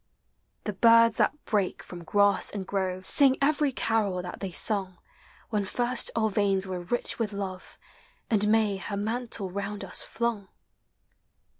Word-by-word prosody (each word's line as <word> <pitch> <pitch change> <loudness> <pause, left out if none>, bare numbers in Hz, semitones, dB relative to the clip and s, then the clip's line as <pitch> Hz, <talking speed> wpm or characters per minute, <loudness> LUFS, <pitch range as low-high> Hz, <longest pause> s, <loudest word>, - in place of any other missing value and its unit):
The 210 - -3
birds 230 +2 +5
that 300 - 0
break 200 -4 -1
from 175 -1 -10
grass 200 +3 +3
and 200 -2 -5
grove 185 -1 -2
Sing 270 +2 +4
every 290 0 +2
carol 215 -7 0
that 180 - -7
they 195 - -4
sung 190 0 -2 0.5
When 210 -2 0
first 240 +4 +1
our 220 -2 +1
veins 195 -1 +1
were 185 -1 -4
rich 240 +9 -1
with 215 -3 -2
love. 190 -2 -6 0.5
And 210 -2 +2
May 215 -2 +2
her 200 +1 -5
mantle 220 -2 -3
round 200 +2 -4
us - - +1
flung. 230 -4 -3
205 Hz, 150 wpm, -27 LUFS, 190-230 Hz, 0.5 s, birds